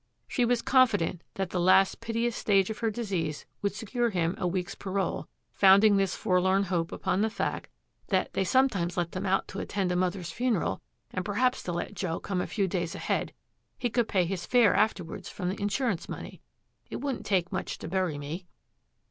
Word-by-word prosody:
She 245 - +1
was 240 0 +1
confident 210 -10 +3
that 190 -2 -2
the 180 - -1
last 185 +4 +4
piteous 230 0 -1
stage 195 -1 +2
of 215 - -6
her 230 - +1
disease 190 -9 -3 0.2
would 200 0 -1
secure 235 +2 -1
him 175 -4 0
a 180 - 0
week's 180 0 -2
parole, 195 0 -2 0.3
founding 200 +2 +6
this 195 -1 +1
forlorn 185 +2 +2
hope 170 -3 -1
upon 185 +2 0
the 220 - +2
fact - - -3 0.4
that - - 0
'they 190 - +1
sometimes 185 -6 +2
let 170 -1 0
them 190 +2 -3
out 195 +1 +1
to 195 - -5
attend 195 -3 -1
a - - 0
mother's 180 -1 -1
funeral, 215 - 0 0.3
and 185 - -2
perhaps 250 +6 +1
they'd 175 - -4
let 175 - -3
Joe 180 -4 -2
come 185 -3 -2
a - - -3
few 200 -3 0
days 175 -2 -2
ahead; - - -1 0.5
he 245 - -1
could 235 -1 +1
pay 185 -4 +2
his 180 0 -4
fare 240 -5 +5
afterwards 180 -6 0
from 180 -2 -3
the 190 - -4
insurance 205 -2 -1
money. - - -7 0.5
It - - -5
wouldn't 275 -3 -3
take 185 -3 +1
much 190 - -3
to - - -7
bury 180 -3 0
me.' 155 +6 -6
195 Hz, 195 wpm, -28 LUFS, 180-220 Hz, 0.5 s, founding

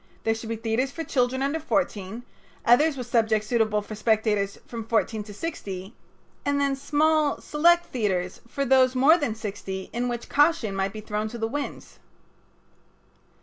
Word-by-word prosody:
There 225 - +2
should 225 0 -7
be 230 - -1
theaters 225 +4 -1
for 325 +4 -5
children 260 -2 0
under 285 +4 0
fourteen, 230 -8 -2 0.4
others 275 +5 +5
with 250 - -4
subjects 220 -3 +2
suitable 215 -3 +1
for 215 - -8
spectators 215 -2 +1
from 230 -2 -6
fourteen 220 -1 0
to 210 - -10
sixty, 195 - -6 0.5
and 285 0 +1
then 280 -1 +1
small 305 +2 +2
select 340 +3 +3
theaters 185 -7 -1
for 275 +3 -2
those 260 0 +4
more 275 +6 +6
than 245 -8 -1
sixty 195 -3 -6
in 245 +1 -1
which 240 -1 -4
caution 290 -9 +2
might 195 0 0
be 215 - -7
thrown 210 0 -2
to 235 - -7
the 225 -1 -1
winds. 285 +5 -6
235 Hz, 165 wpm, -25 LUFS, 215-275 Hz, 0.5 s, more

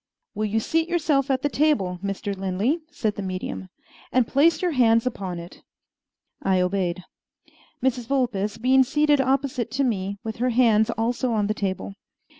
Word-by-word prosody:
"Will 215 +1 -2
you 220 +2 0
seat 325 +8 0
yourself 300 -5 +1
at 265 0 0
the - - +3
table, 245 -13 +1
Mr. 200 0 -3
Lin 190 -1 -3
ley," 260 - +1
said 220 -9 -2
the - - -3
medium, 185 0 -5 0.4
"and 255 -1 +3
place 305 +3 +3
your 360 0 0
hands 230 -4 +3
upon 190 -8 -3
it?" 170 +1 -10 0.8
I 190 -1 +2
obeyed, 180 -1 -1 0.8
Mrs. 250 -3 0
Vulpes 225 -6 0
being 260 +3 +4
seated 295 +1 +2
opposite 265 -3 0
to 275 +1 +1
me, 200 -5 -1
with 220 -1 -5
her 250 +2 +1
hands 225 -3 +3
also 235 +2 -1
on 210 -2 +1
the 210 - 0
table. 195 -1 -3
230 Hz, 170 wpm, -24 LUFS, 200-270 Hz, 0.8 s, being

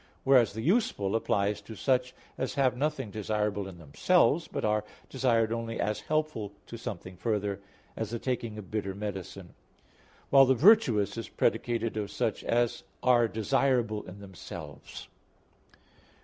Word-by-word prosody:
Whereas 130 -6 +5
the 110 +1 -5
useful 145 - +1
applies 105 -2 0
to 110 +2 -10
such 125 +2 0 0.2
as 130 - -3
have 130 -3 +2
nothing 145 -5 -2
desirable 105 -1 -1
in 95 -2 -10
themselves, 155 - +2
but - - -3
are 105 0 +1 0.3
desired 115 -4 +2
only 115 0 -4
as 105 0 -1
helpful 155 -10 -2
to - - -9
something 95 -5 -7
further, 105 -2 -1 0.4
as 110 - -3
the 115 - -3
taking 115 -3 -3
of 105 -3 -9
bitter 100 -3 -2
medicine; 95 -3 -6 0.8
while 135 -1 +8
the 130 - +4
virtuous 125 - +4
is - - -6
predicated 115 -2 0
of 105 -2 -2
such - - -2
as 120 0 +1 0.2
are 120 -2 +5
desirable 110 0 +1
in 95 +3 -10
themselves. 95 -3 -9
110 Hz, 145 wpm, -29 LUFS, 100-125 Hz, 0.8 s, while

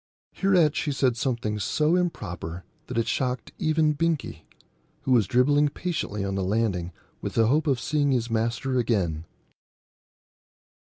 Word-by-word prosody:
Hereat 180 -6 +3
she 150 - -1
said 130 -3 +1
something 115 -4 -2
so 150 - +1
improper 90 - -3 0.2
that - - -5
it 115 0 +1
shocked 125 0 -2
even 155 -2 +2
Binkie, 165 0 -2 0.6
who 130 - -1
was 115 -6 +4
dribbling 145 +6 +3
patiently 140 - -3
on 100 - -2
the 95 -1 -1
landing 95 -3 0 0.3
with - - -5
the 115 - +4
hope 150 +7 +2
of 135 -4 +2
seeing 145 +3 +1
his 120 -3 +1
master 115 +3 0
again. 90 -9 0
125 Hz, 145 wpm, -26 LUFS, 105-150 Hz, 0.6 s, was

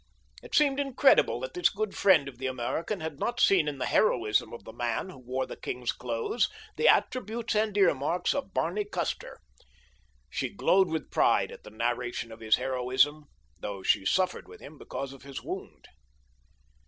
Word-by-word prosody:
It - - -6
seemed 285 -2 +4
incredible 275 0 +4
that - - -5
this 360 -1 +3
good 215 0 -3
friend 180 -8 +4
of 125 -3 -10
the 130 - -2
American 130 - -3
had 155 -2 -5
not 240 +1 -2
seen 185 -9 +4
in 145 -2 -3
the 130 - -2
heroism 115 - +2
of 120 - -9
the 110 - -10
man 120 +9 -2
who 155 - -13
wore 130 +1 -3
the - - -8
king's 125 -1 -3
clothes 120 - -1 0.3
the 470 - +2
attributes 235 -1 +2
and 210 -1 +1
ear 195 -3 +5
marks 145 +6 -1
of 275 -8 -4
Barney 185 +4 0
Custer. 205 - -4 0.9
She - - -3
glowed 190 0 +3
with 160 -2 -4
pride - - +3
at - - -11
the - - -12
narration 120 +1 -2
of 110 - -10
his 110 -1 +3
heroism, 130 +4 +1 0.3
though 100 -2 -6
she 95 - +3
suffered 185 - 0
with - - -13
him 150 +1 -12
because 135 0 -6
of 135 - -14
his 140 0 -8
wound. - - -7
145 Hz, 180 wpm, -28 LUFS, 125-200 Hz, 0.9 s, ear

